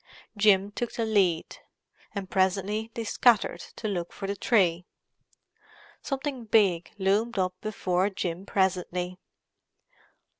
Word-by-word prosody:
Jim 205 -1 +4
took 240 +3 -3
the 230 - -1
lead, 190 -7 +1 0.6
and 200 -2 -4
presently 195 +3 +1
they 230 - -3
scattered 225 -5 +3 0.2
to 220 - -4
look 175 -4 -3
for - - -7
the 200 +1 -2
tree. 180 -6 +2 1.2
Something 270 -3 -4
big 195 -6 +3
loomed 205 +4 +1
up 185 -1 +1
before 190 -3 0
Jim 185 -1 -4
presently. 180 -1 -1
195 Hz, 115 wpm, -27 LUFS, 185-215 Hz, 1.2 s, Jim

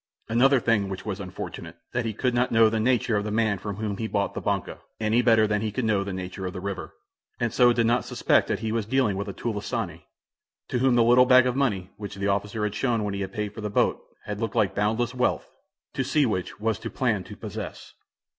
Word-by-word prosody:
Another 130 +4 +4
thing 110 -5 +1
which 95 0 -6
was 100 -2 -3
unfortunate; 90 -3 -7 0.2
that 120 -1 -1
he 115 - -1
could 125 +2 0
not 120 +1 +1
know 115 -1 +6
the 110 - 0
nature 120 -1 +2
of 100 - -1
the 105 - -3
man 105 -2 +1
from 100 +1 -5
whom 105 -1 -3
he 110 - -2
bought 100 -2 -1
the - - -4
"banca," - - -2 0.2
any 110 +2 +2
better 115 -3 +5
than 105 0 0
he 110 -1 -2
could 125 +3 -2
know 105 -3 +2
the 100 - -5
nature 95 +1 -5
of 90 - -5
the 90 - -5
river, 95 -1 -5 0.4
and 120 -2 -1
so 125 -1 +5
did 115 -1 +2
not 120 +1 +2
suspect - - +2
that - - -2
he 110 -1 -2
was 110 -2 -1
dealing 130 -5 +2
with 100 +2 -3
a 100 - -4
"tulisane," 105 -5 -3 0.7
to 125 - 0
whom 130 -1 +3
the 120 - +5
little 125 +2 +6
bag 130 0 +7
of 125 -1 0
money 105 -10 0
which 100 -1 -7
the 100 0 -2
officer 100 +2 -1
had 105 -1 -1
shown 115 -1 0
when 105 -1 -2
he 100 - -3
had 95 -1 -4
paid 105 0 -4
for 110 - -8
the 105 - -3
boat 100 - +1 0.2
had 105 0 -4
looked 115 -2 -2
like 100 - +2
boundless 110 +4 0
wealth, 125 0 -1 0.4
to - - -1
see 150 -2 +2
which 95 -6 -3
was 110 +1 0
to 115 0 -5
plan 110 -8 0
to - - -10
possess. - - -7
110 Hz, 250 wpm, -26 LUFS, 100-120 Hz, 0.7 s, bag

